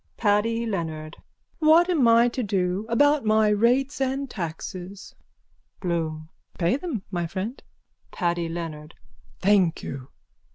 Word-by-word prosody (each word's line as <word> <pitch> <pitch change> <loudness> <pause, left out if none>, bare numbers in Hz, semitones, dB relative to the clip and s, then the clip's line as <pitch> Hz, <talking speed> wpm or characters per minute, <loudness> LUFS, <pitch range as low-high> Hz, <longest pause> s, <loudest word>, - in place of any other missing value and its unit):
PADDY 225 +2 +1
LEONARD: 160 -6 -4 0.4
What 320 +3 +5
am 315 -9 +3
I 230 +1 +6
to 250 - -3
do 195 -1 -1
about 290 +4 +3
my 215 0 +3
rates 250 +7 +2
and 270 +1 -1
taxes? 185 0 -7 0.7
BLOOM: 160 -3 -2 0.3
Pay 175 +5 +2
them, 285 - -4
my 175 -2 -2
friend. 195 - -5 0.5
PADDY 170 -2 -1
LEONARD: 165 -2 -6 0.5
Thank 190 -4 +3
you. 135 -1 -6
205 Hz, 120 wpm, -25 LUFS, 170-235 Hz, 0.7 s, I